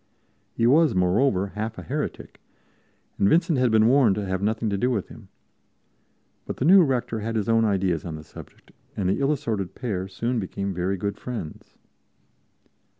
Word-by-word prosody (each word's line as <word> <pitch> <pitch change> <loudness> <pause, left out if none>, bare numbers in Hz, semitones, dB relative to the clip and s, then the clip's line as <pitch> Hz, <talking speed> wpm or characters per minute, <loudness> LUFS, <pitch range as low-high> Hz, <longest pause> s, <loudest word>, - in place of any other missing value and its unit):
He 115 - +1
was, 150 - +4
moreover, 95 +2 +2
half 110 +3 -5
a 90 - -7
heretic, - - -5 0.8
and 100 - +4
Vincent 165 -4 +2
had 125 -1 +3
been 110 -1 +4
warned 125 -6 +4
to 105 0 -3
have 95 0 -2
nothing 110 +2 -1
to 100 - 0
do 125 - +1
with 110 -7 -2
him. - - -13 1.2
But - - -5
the 130 - -1
new 190 +4 +8
rector 125 -7 0
had 115 +2 -4
his 105 -3 -1
own 115 0 +3
ideas 95 -6 0
on 80 -2 -6
the 75 - -9
subject, - - -14 0.3
and 95 -3 0
the 95 - 0
ill 140 +1 +2
assorted 110 -10 -3
pair 100 -7 -3
soon 115 +5 -2
became 100 0 -4
very 90 +2 -2
good 100 +2 -4
friends. 115 -11 -7
110 Hz, 180 wpm, -24 LUFS, 95-125 Hz, 1.2 s, new